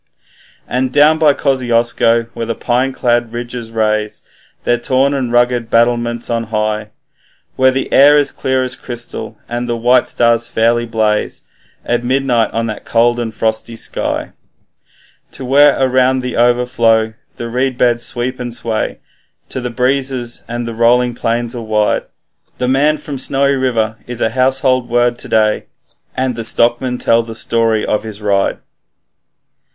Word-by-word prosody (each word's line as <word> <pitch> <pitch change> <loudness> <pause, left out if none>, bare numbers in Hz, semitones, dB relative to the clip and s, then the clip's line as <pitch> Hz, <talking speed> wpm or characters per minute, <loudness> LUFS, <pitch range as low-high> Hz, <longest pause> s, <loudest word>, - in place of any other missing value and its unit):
And 130 0 -1
down 150 +3 +4
by 150 -3 +4
Kosciusko, 120 -3 +1
where 115 -1 -4
the 115 - -2
pine 125 +2 0
clad 120 -2 0
ridges 120 -1 -6
raise 110 -1 -1 0.4
Their 120 0 +1
torn 130 +3 +1
and 130 -4 -2
rugged 120 -1 +1
battlements 120 0 +1
on 115 -1 -1
high, 110 -1 -2 0.7
Where 130 0 +4
the 130 +1 -2
air 145 +2 +7
is 145 - +1
clear 130 0 -1
as 130 0 -3
crystal, 120 -2 -7
and 120 +1 -4
the 120 - -1
white 125 +2 +3
stars 115 -1 +2
fairly 120 +1 +1
blaze 110 -2 -1 0.4
At 120 0 0
midnight 125 -2 +1
in 115 0 -1
the 110 -1 -4
cold 120 +1 +2
and 115 -2 -3
frosty 110 +1 -2
sky, - - -3 1.1
And 130 - -7
where 145 +2 +5
around 130 0 +2
the 125 0 -4
Overflow 115 -2 +2 0.2
the 120 - -6
reedbeds 125 -1 +1
sweep 125 +1 -3
and 120 -1 -4
sway 115 -2 -3 0.5
To 130 - -4
the 125 - -3
breezes, 125 0 -1
and 120 0 -4
the 115 - -4
rolling 120 +2 +3
plains 115 +1 -2
are 120 - -5
wide, 110 -1 0 0.5
The 125 - -1
man 145 +4 +2
from 140 -3 -6
Snowy 140 +1 +1
River 115 -5 0
is 120 -1 -6
a 110 - 0
household 130 0 +1
word 120 0 +1
to - - -4
day, 110 -1 +2 0.5
And 130 -1 0
the 115 - -5
stockmen 120 +2 +2
tell 115 -1 +2
the 115 -1 -8
story 115 -1 +1
of 105 - 0
his 110 -2 -8
ride. 100 -2 0
120 Hz, 155 wpm, -15 LUFS, 115-130 Hz, 1.1 s, air